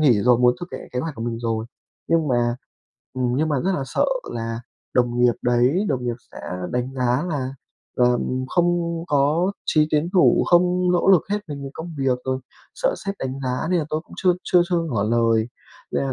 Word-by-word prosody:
nghỉ 120 -9 +4
rồi, 125 -1 +5
muốn 125 0 +4
thực 175 - -5
hiện - - -7
kế 125 - -1
hoạch 160 -1 -4
của 115 - -6
mình 115 -1 -3
rồi, 115 -1 -2 0.4
nhưng 165 -3 +2
mà 120 -1 +1 0.6
ừm, 125 -1 0
nhưng 155 +2 +1
mà 145 - +1
rất 190 - +2
là 140 - -1
sợ - - +1 0.3
là 115 0 -4 0.3
đồng 120 -1 +2
nghiệp 125 -1 +5
đấy, 125 - +2
đồng 125 -3 -1
nghiệp 120 -1 -1 0.2
sẽ - - -9 0.3
đánh 125 +2 -2
giá 125 +1 +1
là 135 -5 -2 0.5
là 125 0 +4 0.3
không 170 -1 0
có 150 +6 +2
chí 155 -1 +3
tiến 155 +3 +1
thủ, 185 - +5
không 180 +1 +3
nỗ 180 +2 +2
lực 185 -5 +6
hết 210 - +1
mình 140 -1 -6
vì 135 - -6
công 165 +1 -7
việc, 130 -2 +1
rồi 130 0 -1 0.4
sợ - - 0
sếp 195 0 -2
đánh 135 +1 -4
giá 130 +4 -2
nên 180 - +3
là 155 - 0
tôi 155 0 -1
cũng - - -19
chưa 180 - +3
chưa 175 -1 +4
chưa 175 - +3
ngỏ 125 -11 -1
lời. 115 0 +2 0.4
Nên - - 0
là 135 - -1
135 Hz, 215 wpm, -22 LUFS, 120-165 Hz, 0.6 s, lực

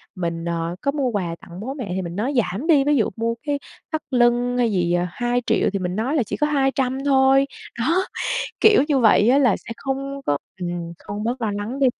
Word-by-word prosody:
mình, 170 -2 -3
ờ, 170 0 -2
có 280 - +1
mua 280 -3 0
quà 180 -6 -2
tặng 175 +1 -11
bố 260 +6 -4
mẹ 245 -10 -6
thì 190 - -1
mình 170 0 -6
nói 240 +8 -1
giảm 225 - -1
đi, 295 -5 +5
ví 290 +1 +2
dụ 225 - +2
mua 230 +1 -1
cái 285 -1 -1 0.3
thắt 315 -1 -1
lưng 245 0 +3
hay 240 -2 +2
gì, 175 -3 +1
ờ, 175 0 +1
2.000.000 240 +3 0
thì 195 - -1
mình 180 0 -3
nói 250 +8 -1
là 260 - +3
chỉ - - -5
có 300 - +2
200.000 270 -3 +1
thôi. 270 0 +5 0.3
Đó, 315 +9 +2 0.7
kiểu 430 -7 +6
như 285 -3 +3
vậy 220 -2 +5
á, 265 - +5
là 250 -8 +4
sẽ - - -12
không 275 +1 -4
có 145 - +1 0.2
ừm, 175 -1 -4
không 205 +1 -6
bớt 245 +2 -2
lo 215 - 0
lắng 205 +6 -4
đi, 275 - +4
240 Hz, 230 wpm, -22 LUFS, 190-270 Hz, 0.7 s, kiểu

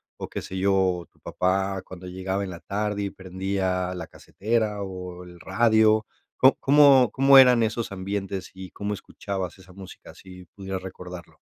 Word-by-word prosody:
o - - -7
qué - - -5
sé 95 - -7
yo, 100 +1 +2
o 90 -2 +1
tu - - -33
papá 95 +1 -1
cuando 90 0 -10
llegaba 95 +2 -3
en - - -7
la 85 - -9
tarde, 105 0 -2
y 100 - -2
prendía 95 -1 -3
la 90 -3 -7
casetera, 110 -1 -2
o 90 -2 -8
el 90 -1 -14
radio, 110 +1 +3 0.3
¿có 130 +1 +5
cómo 140 -3 +6
cómo 135 +1 +6
eran 125 -2 +6
esos 110 0 -1
ambientes 95 0 -4
y 95 -1 -9
cómo 105 0 -4
escuchabas 95 -2 -6
esa 95 0 -16
música? 95 0 -12
Si 90 -1 -13
pudieras 95 +1 -7
recordarlo. 90 -1 -10
95 Hz, 170 wpm, -25 LUFS, 90-105 Hz, 0.3 s, cómo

